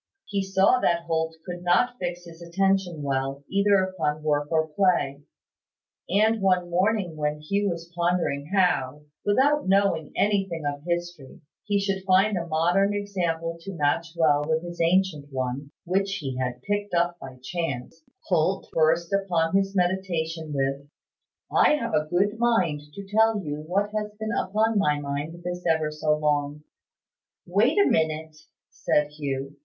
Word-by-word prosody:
He 200 -1 -1
saw 195 +5 +3
that 170 -7 +1
Holt 160 -1 -1
could 175 -1 -6
not 185 +8 +2
fix 175 -1 -4
his 165 0 -13
attention 180 -2 0
well, 135 0 -2
either 200 -1 +3
upon 160 -5 -2
work 145 0 0
or 160 -1 +2
play; 150 -5 +1 0.9
and 215 +3 +3
one 180 -2 +2
morning, 185 -1 +1
when 150 0 -2
Hugh 200 +7 0
was 170 0 -6
pondering 170 -5 0
how, 150 -8 +1 0.2
without 270 +5 +2
knowing 190 -6 +2
anything 195 -6 0
of 145 0 -2
history, 175 -5 -4 0.2
he 205 -1 +1
should 195 -1 -1
find 195 +2 +3
a 170 -1 -3
modern 175 +6 +2
example 170 -5 -2
to 195 +2 -7
match 150 +2 +1
well 150 -3 +3
with 160 +1 0
his 175 -1 -6
ancient 165 -4 +1
one 130 +2 -3 0.2
(which 195 +2 0
he 135 -8 -4
had 125 -1 -3
picked 205 -2 -2
up 175 0 +1
by 130 -1 -9
chance), 165 -2 -4 0.2
Holt 180 +1 0
burst 165 +2 +2
upon 180 -3 +1
his 195 0 +1
meditation 170 -4 -1
with 140 0 -2 0.6
"I - - +5
have 235 -6 -3
a 155 0 +1
good 200 +5 +1
mind 190 -11 +2
to 200 - -7
tell 220 +2 +3
you 150 -6 -4
what 200 +4 0
has 210 0 -3
been 220 +1 -3
upon 215 +3 +1
my 150 -6 +2
mind 145 +4 -5
this 180 0 -4
ever 160 -2 +1
so 150 0 0
long." 150 -1 -1 0.8
"Wait 205 - +2
a 405 - +6
minute," 160 0 0 0.4
said 150 0 0
Hugh. 140 -1 -4
175 Hz, 155 wpm, -25 LUFS, 150-195 Hz, 0.9 s, a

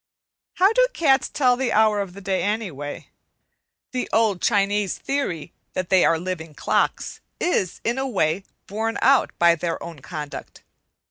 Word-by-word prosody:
How 385 +4 +4
do - - +4
cats 275 -5 +2
tell 250 -3 +3
the 260 0 -1
hour 215 -1 +3
of 195 0 -7
day, 190 0 0
anyway? 190 -10 -4 0.8
The 250 -1 -3
old 220 -5 +2
Chinese 205 -1 +1
theory 225 - -3 0.2
that 185 -2 -3
they 190 -1 +6
are 165 - +4
living 165 -3 -5
clocks - - -1 0.2
is, 195 - 0
in 240 +3 0
a 270 - -1
way, 185 -6 0 0.2
borne 220 +3 -2
out 265 +1 +5
by 170 0 +5
their 170 0 -2
own 170 -3 -8
conduct. 150 +1 -8
200 Hz, 150 wpm, -23 LUFS, 170-245 Hz, 0.8 s, they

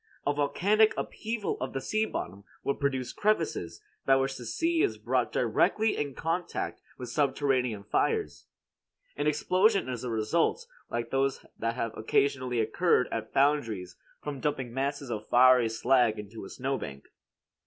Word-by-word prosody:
A 145 - +2
volcanic 205 +10 +3
upheaval 220 -1 -3
of 130 - -3
the 135 - -1
sea 215 +10 0
bottom 95 +3 -5 0.2
would 140 - -1
produce 135 -3 -1
crevices, 165 - -1 0.2
by 135 - +5
which 135 0 0
the 120 -3 -8
sea 330 - +1
is 400 - +1
brought - - 0
directly 220 0 +2
in 145 -3 -3
contact 165 +2 -3 0.2
with 125 -2 -7
subterranean 130 -6 +1
fires. - - -1 0.7
An 145 +1 -1
explosion 185 - +3
is 125 -2 -4
the 125 - -4
result, 140 - +1 0.2
like 120 0 -3
those 135 0 0
that 115 0 -1
have 115 -3 -3
occasionally 125 +1 +1
occurred 125 +5 +2
at 110 -1 -4
foundries 115 -11 +1 0.3
from 145 -2 -4
dumping 130 -4 -2
masses 140 0 -2
of 110 -1 -5
fiery 125 -1 +6
slag 120 -1 +3
into 105 0 -8
a - - -9
snowbank. 130 - -4
135 Hz, 150 wpm, -29 LUFS, 115-150 Hz, 0.7 s, fiery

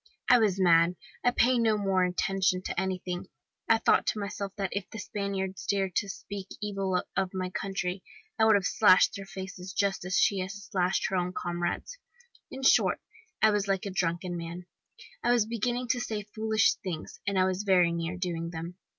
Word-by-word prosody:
I 245 - +7
was 200 -4 +2
mad, 170 -1 +5 0.3
I - - +5
paid 245 0 +3
no 220 -2 +3
more 195 -2 +2
attention 185 0 +1
to - - -2
anything, 185 -1 -3 0.4
I 225 - +6
thought 225 - +3
to 215 - 0
myself 200 -1 -4
that 195 -3 -2
if 200 -1 -3
the 225 - -8
Spaniards 195 -3 -4
had 200 - +2
dared 190 -2 -1
to 200 - 0
speak 195 +1 -7
evil 195 -3 -1
of 190 0 -1
my 185 -1 -2
country, 190 -1 -3 0.4
I 220 - +5
would 220 -1 +6
have 195 -1 +1
slashed 185 -3 +5
their 195 -1 -7
faces 190 0 -7
just 200 -1 0
as 180 0 -1
she 200 - +3
had 185 0 -3
slashed 195 -3 -1
her 180 -1 0
comrade's. 175 - -3 0.5
In 265 - -8
short, - - +4 0.4
I 220 - +7
was 205 -1 0
like 195 0 0
a 200 - -3
drunken 175 0 -1
man, 170 +1 -6 0.6
I - - +3
was 240 -3 +3
beginning 240 +2 -2
to 245 - +2
say 215 -3 -3
foolish 220 -1 +3
things, 175 -5 -6
and 200 -1 0
I 185 - +4
was 185 0 -1
very 185 -4 +4
near 170 +1 -3
doing 170 -2 -3
them. 170 +1 -7
190 Hz, 195 wpm, -29 LUFS, 180-205 Hz, 0.6 s, I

